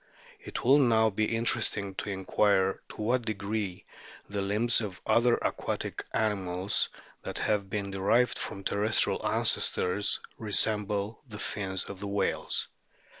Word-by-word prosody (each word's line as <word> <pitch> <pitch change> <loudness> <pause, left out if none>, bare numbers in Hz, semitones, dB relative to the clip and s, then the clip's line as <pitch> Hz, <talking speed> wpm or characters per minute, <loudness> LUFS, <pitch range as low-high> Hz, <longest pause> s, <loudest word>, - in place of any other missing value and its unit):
It - - -6
will 135 +4 +6
now 110 -4 +4
be 110 +2 +1
interesting 110 -4 0
to - - -3
inquire 95 0 +2
to - - -8
what 125 +3 +2
degree 105 -3 -3 0.4
the 100 -1 -3
limbs 110 +5 +1
of 100 -5 -5
other 120 0 +4
aquatic - - -3
animals 100 -3 0 0.3
that - - -6
have 100 -2 0
been 100 -1 -3
derived 100 +6 +2
from 100 - -5
terrestrial 105 +3 +2
ancestors 100 +3 +1 0.2
resemble 105 0 +1
the 105 -3 -7
fins 95 -3 -2
of 100 - -8
the 100 - -5
whales. 100 0 -1
105 Hz, 130 wpm, -29 LUFS, 100-110 Hz, 0.4 s, will